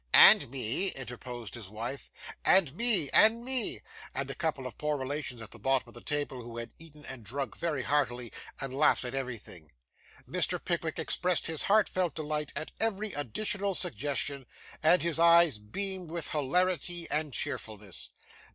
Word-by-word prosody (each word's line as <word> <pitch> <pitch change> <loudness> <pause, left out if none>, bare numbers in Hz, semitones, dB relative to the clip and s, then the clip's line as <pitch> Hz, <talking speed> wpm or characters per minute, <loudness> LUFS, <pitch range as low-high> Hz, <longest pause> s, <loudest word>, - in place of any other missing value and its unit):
'And - - +9
me,' 130 - +1
interposed 125 -3 -6
his 110 -6 -7
wife. 115 +6 -6 0.3
'And 175 -8 +4
me, 195 - +5
and 230 +2 +5
me,' 255 -4 +2 0.3
said 135 0 -3
a - - -5
couple 145 -2 -3
of 125 -4 -7
poor 150 -1 -1
relations 130 -3 -4
at 110 - -9
the 115 - -10
bottom 130 0 0
of - - -14
the 120 - -9
table, 145 -4 -2
who 115 0 -10
had 115 0 -6
eaten 150 -2 -13
and 130 -3 -7
drunk 135 +7 -5
very 150 -6 -2
heartily, 125 -4 -1 0.3
and 135 -1 -3
laughed 140 -1 +3
at 125 - -5
everything. 115 - -7 0.6
Mr. - - +2
Pickwick - - -3
expressed 180 -1 +1
his 160 -2 0
heartfelt 185 -5 +2
delight 150 -1 -3
at 155 - -4
every 215 -1 -1
additional 195 - -1
suggestion; 140 +1 -1 0.3
and 165 +3 +4
his 170 -2 0
eyes 170 -6 +5
beamed 185 - -1
with 170 -2 -4
hilarity 175 +3 0
and 150 -1 +1
cheerfulness. 105 -5 -3
145 Hz, 160 wpm, -29 LUFS, 125-170 Hz, 0.6 s, And